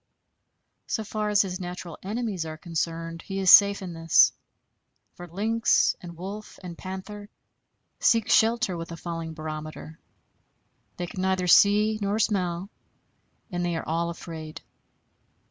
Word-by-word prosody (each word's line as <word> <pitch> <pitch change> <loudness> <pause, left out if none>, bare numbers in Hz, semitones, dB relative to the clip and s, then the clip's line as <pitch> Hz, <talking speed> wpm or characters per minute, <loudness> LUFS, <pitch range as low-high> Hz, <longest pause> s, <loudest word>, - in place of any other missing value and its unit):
So 220 - -2
far 210 0 -3
as 205 -1 +4
his 185 -1 -5
natural 180 -2 -7
enemies 210 -3 -3
are 155 -1 -7
concerned, 165 0 -4
he 195 - -6
is 190 -2 +4
safe 200 -1 +7
in 180 -2 -6
this; 165 -1 +4 0.8
for 175 - -10
lynx 220 +6 +2
and 170 -2 -10
wolf 200 +4 -8
and 175 -2 -7
panther, 195 +3 -8 0.7
seek 225 -2 +3
shelter 225 -3 +3
with 165 0 -6
a 165 - -6
falling 165 -1 -6
barometer. 155 +1 -7 1.0
They 175 - -3
can 185 +2 -6
neither 190 -1 0
see 210 +4 +5
nor 200 +1 0
smell; 190 -3 -1 0.8
and 175 0 -2
they 175 -1 -1
are 165 - -5
all 170 +1 -1
afraid. 160 -2 -8
180 Hz, 140 wpm, -26 LUFS, 165-205 Hz, 1.0 s, safe